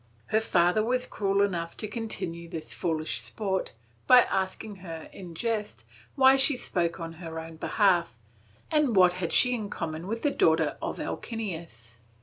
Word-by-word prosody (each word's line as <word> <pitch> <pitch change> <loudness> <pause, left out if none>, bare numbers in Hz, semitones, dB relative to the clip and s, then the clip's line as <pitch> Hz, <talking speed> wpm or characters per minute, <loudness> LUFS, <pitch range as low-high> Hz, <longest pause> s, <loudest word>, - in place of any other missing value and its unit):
Her 220 - +3
father 180 -1 +2
was 250 +2 0
cruel 200 -1 0
enough 170 -4 -2
to 215 - -2
continue 190 -7 -3
this 165 -3 -5
foolish 160 -2 -1
sport, 195 -3 -3 0.3
by 250 -1 +9
asking 190 +2 -3
her, 165 -4 -9
in 175 -3 -10
jest, 215 +1 -3 0.3
why 265 -1 +6
she 270 0 +5
spoke 175 -7 -1
on 165 -1 -6
her 165 -1 -7
own 160 0 -8
behalf 175 - +1 0.5
and 300 -7 +2
what 180 -2 +6
had 180 -2 -3
she 250 -1 +5
in 215 -4 -3
common 165 -1 -5
with 225 +2 -4
the 290 - +2
daughter 160 -10 +2
of - - -4
Alcinous. 165 - -6
185 Hz, 160 wpm, -27 LUFS, 165-220 Hz, 0.5 s, by